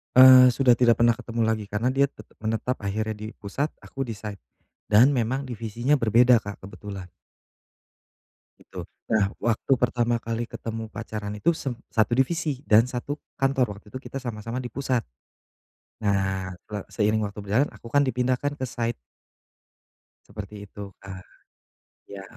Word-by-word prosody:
Eee, 130 0 +10
sudah 125 -1 +4
tidak 120 -1 +4
pernah 120 0 +5
ketemu 115 +1 -4
lagi 110 -1 0
karena 105 +4 0
dia 135 +2 +3
tetap 140 - -5
menetap 115 +3 -1
akhirnya 110 +2 -2
di 105 +1 -7
pusat 140 +9 -3
aku 135 - -5
di 120 - -5
site 105 -2 -7 0.5
dan 125 +7 +6
memang 130 +3 -1
divisinya 120 +3 0
berbeda, 120 0 +5
Kak, 100 0 -7
kebetulan. 95 -2 -9 1.5
Gitu, - - -15 0.3
nah 110 -2 +4 0.2
waktu 115 +3 0
pertama 120 -1 +2
kali 115 +1 -2
ketemu 115 0 -5
pacaran 105 -2 -5
itu 170 - +3
sem 135 - -2 0.2
satu 110 +1 +4
divisi 145 -1 0
dan 110 +1 +7
satu 130 +3 -4 0.2
kantor 135 -1 +3
waktu 105 - -17
itu 130 - -6
kita - - -5
sama-sama 115 0 -4
di 125 - -5
pusat. 130 -2 -1 1.0
Nah 95 -2 0 0.2
se 105 - -5 0.2
seiring 105 +1 +3
waktu 100 +1 -7
berjalan 110 +9 +2
aku 115 - -12
kan 145 - +5
dipindahkan 130 +3 0
ke 130 - -1
site. 120 -1 -2 1.3
Seperti 105 0 -8
itu, 100 -1 -9
Kak. 95 -2 -9 0.8
Iya. 100 -1 -8
115 Hz, 150 wpm, -25 LUFS, 105-130 Hz, 1.5 s, Eee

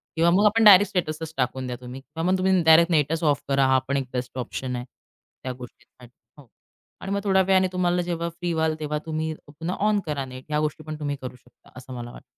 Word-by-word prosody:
किंवा 165 +1 +3
मग 205 +3 +4
आपण 220 +2 +4
डायरेक्ट 205 -1 +8
स्टेटसच 160 -3 -3
टाकून 130 0 -1
द्या 125 - -4
तुम्ही. 125 +2 -9
किंवा 160 +4 -7
मग 190 - +3
तुम्ही 185 0 +2
डायरेक्ट 160 +2 +6
नेटंच 160 +1 +1
ऑफ 145 -3 +2
करा. 135 -1 +3
हा 130 0 +4
पण 140 +1 0
एक 135 -2 -3
बेस्ट 125 0 -4
ऑप्शन 125 0 -4
आहे. 125 0 -5 0.6
त्या 130 - -3
गोष्टीसाठी. 125 0 -14 0.3
हो. 145 -3 -16 0.5
आणि 195 - -5
मग 200 0 0
थोड्या 190 -2 +3
वेळाने 190 0 +3
तुम्हाला 180 -1 +1
जेव्हा 170 0 -2
फ्री 170 +1 -4
व्हाल, 160 -1 0
तेव्हा 150 0 -2
तुम्ही 160 0 -2
पुन्हा 165 +5 -5
ऑन 210 -1 +2
करा 145 -3 -3
नेट. 130 0 -10
ह्या 150 0 0
गोष्टी 155 +1 -5
पण 155 0 -6
तुम्ही 145 -1 -2
करू 130 -1 -7
शकता. 125 -1 -24
असं 130 0 -10
मला 120 -1 -7
वाट - - -13
155 Hz, 230 wpm, -24 LUFS, 130-175 Hz, 0.6 s, डायरेक्ट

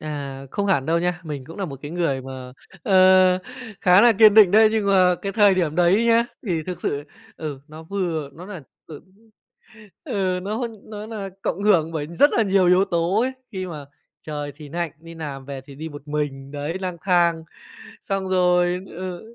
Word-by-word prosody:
À, 140 -3 -6
không 200 - -2
hẳn 160 -9 +1
đâu 165 +1 +2
nha, 175 0 -2
mình 145 -4 -6
cũng 165 +5 -11
nà 200 - -3
một 140 -6 -7
cái 145 - -7
người 165 -6 -1
mà, 130 -1 -9 0.3
ờ, 185 -3 +5 0.4
khá 180 +1 +6
là 240 +2 +6
kiên 215 0 +6
định 210 -4 +8
đấy. 215 +2 +6
Nhưng 220 -2 0
mà 185 -2 +4
cái 195 - -3
thời 205 -2 +5
điểm 170 -5 0
đấy 180 +6 +3
nhá, 230 0 +4 0.2
thì 170 -5 -1
thực 180 +2 -6
sự, 145 0 -2 0.3
ừ, 150 -4 -6
nó 155 +1 -11
vừa 165 -5 -3
nó 170 +5 -11
nà 185 -6 -8 0.2
ừ, 155 -3 -10 1.0
ừ, 185 -2 -1
nó 220 +5 -2 0.2
nó 210 -1 -8
nà 210 -3 -6
cộng 200 +1 -3
hưởng 170 -6 +3
bởi 150 -2 -4
rất 170 - +3
là 230 - +3
nhiều 195 -2 +3
yếu 180 +2 +4
tố 175 +2 0
ấy. 255 +2 0 0.2
Khi 190 -3 -4
mà 155 -5 -8 0.4
trời 145 -1 -5
thì 150 -1 -11
nạnh, 170 0 -3
đi 165 +1 -12
làm 140 -4 -7
về 140 -1 -7
thì 135 +1 -14
đi 160 +3 -7
một 145 -1 -11
mình, 140 -2 -4
đấy, 150 +5 -4
lang 180 -2 -4
thang. 170 -3 +2 0.6
Xong 195 -1 -3
rồi, 180 -1 +2
ừ, 185 +6 -8
175 Hz, 200 wpm, -22 LUFS, 150-195 Hz, 1.0 s, định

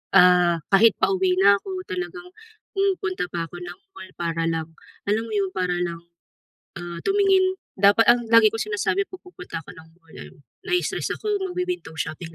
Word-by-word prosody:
ah, 180 -1 +5
kahit 210 +2 +6
pauwi 190 -1 +2
na 200 +1 +6
ako, 375 - -6
talagang 360 -2 -5 0.5
pumupunta 380 - -1
pa 170 -1 -2
ako 175 - -9
ng 175 0 -9 0.2
mall 190 -1 -11
para 165 -1 -2
lang, 165 -1 -2 0.4
alam 215 +2 +1
mo - - -9
'yon, 195 -2 0
para 180 -1 -1
lang, 170 -1 -4 0.8
ah, 175 -1 -7
tumingin, 390 -2 +3 0.2
dapat 200 +3 +5
ang 240 -1 +2
lagi 225 -1 +6
kong 225 0 -3
sinasabi 390 - 0
'pag 370 - -12
pupunta 180 - -8
ako - - -12
ng 160 -2 -15
mall, 165 -3 -18
eh 75 0 -11 0.3
"Na-i-stress 360 0 -1
ako, 425 - -4 0.2
mag 360 - -7
wi-window 360 - -3
shopping 165 +1 -5
200 Hz, 175 wpm, -23 LUFS, -, 0.8 s, kahit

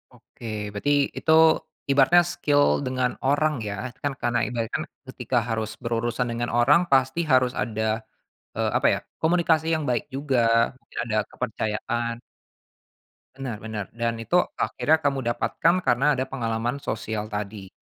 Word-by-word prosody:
Oke, - - -15 0.3
berarti 105 +8 -1 0.3
itu 160 - 0 0.6
ibaratnya 145 +6 +6
skill 145 -1 +2 0.2
dengan 130 -1 0 0.2
orang 150 +2 +2 0.2
ya, 100 - -3 0.3
kan 145 - +1
karena 120 0 +1
ibarat 115 -1 -3
kan, 155 - -1 0.2
ketika 125 -1 -2
harus 110 -1 -1
berurusan 120 +1 -1
dengan 120 +1 -2
orang 140 +7 +6
pasti 130 +3 +3
harus 130 -1 +4
ada, 110 -1 -2 0.8
eee, - - 0
apa - - +2
ya, - - -2 0.2
komunikasi 160 -1 +2
yang 155 -1 -2
baik 120 - 0
juga, 135 -1 0 0.6
ada 115 -2 -2
kepercayaan. 115 0 -2 1.2
Bener, 130 -5 -5
bener. 110 -2 -4
Dan 115 -1 -2
itu 175 +11 +2 0.2
akhirnya 160 +1 +2
kamu 140 -3 -1
dapatkan 135 +8 +1
karena 135 -2 +2
ada 130 +1 -2
pengalaman 120 +1 -3
sosial 110 0 -4
tadi. 100 -2 -5
125 Hz, 140 wpm, -25 LUFS, 115-140 Hz, 1.2 s, ibaratnya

